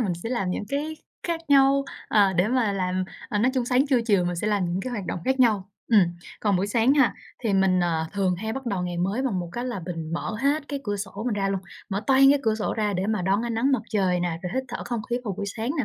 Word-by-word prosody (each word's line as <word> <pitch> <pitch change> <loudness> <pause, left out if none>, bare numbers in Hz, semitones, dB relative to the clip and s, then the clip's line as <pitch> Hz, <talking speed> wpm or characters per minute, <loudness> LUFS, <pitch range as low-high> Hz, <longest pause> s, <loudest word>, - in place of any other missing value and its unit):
mình 200 -6 +1
sẽ - - -3
làm 195 -7 -1
những 195 - -3
cái 300 +3 -2 0.3
khác 335 -1 -2
nhau, 275 0 +5 0.2
ờ, 200 -3 +4
để 180 +3 +2
mà 240 -4 +2
làm, 185 -1 -1 0.2
ờ, 210 - -1
nói 240 +5 +3
chung 255 -2 +1
sáng 255 +3 +2
trưa 265 -4 +3
chiều 200 -5 +3
mình 175 0 -2
sẽ 205 - -2
làm 205 -3 +1
những 175 +2 -1
cái 255 - -4
hoạt 210 -6 -4
động - - -2
khác 265 0 +1
nhau. 210 -6 +3 0.2
Ừm. 215 - +8 0.4
Còn 205 -3 +2
buổi 190 +2 0
sáng 230 +5 +3
ha, 270 -5 +4 0.3
thì 220 - +1
mình, 190 -1 +3
ờ, 165 -2 0
thường 195 -3 +1
hay 220 +4 -3
bắt 265 +2 -6
đầu 195 -6 -1
ngày 175 -1 -3
mới 195 +8 0
bằng 240 -9 0
một 175 - -5
cái 240 +4 -3
là 240 -6 -3
mình 165 -3 -5
mở 170 +5 -3
hết 285 +2 +1
cái 280 -1 -3
cửa 205 -2 -1
sổ 200 +1 -6
mình 240 - +1
ra 195 -1 0
luôn, 195 -1 -1 0.3
mở 200 0 -1
toang 270 0 +6
cái 285 - +4
cửa 220 -3 +2
sổ 215 -1 -2
ra 210 -2 0
để 190 0 -1
mà 215 -3 0
đón 195 +4 +1
ánh 235 -1 -2
nắng 260 +5 +2
mặt 250 -5 +1
trời 185 -4 +1
nè, 175 -2 -1
rồi 180 - -3
hít 260 0 0
thở 240 - -4
không 240 -2 -2
khí 240 - +2
vào 200 - -2
buổi 200 - -3
sáng 225 +4 -3
nè, 275 - +1
210 Hz, 290 wpm, -25 LUFS, 190-250 Hz, 0.4 s, Ừm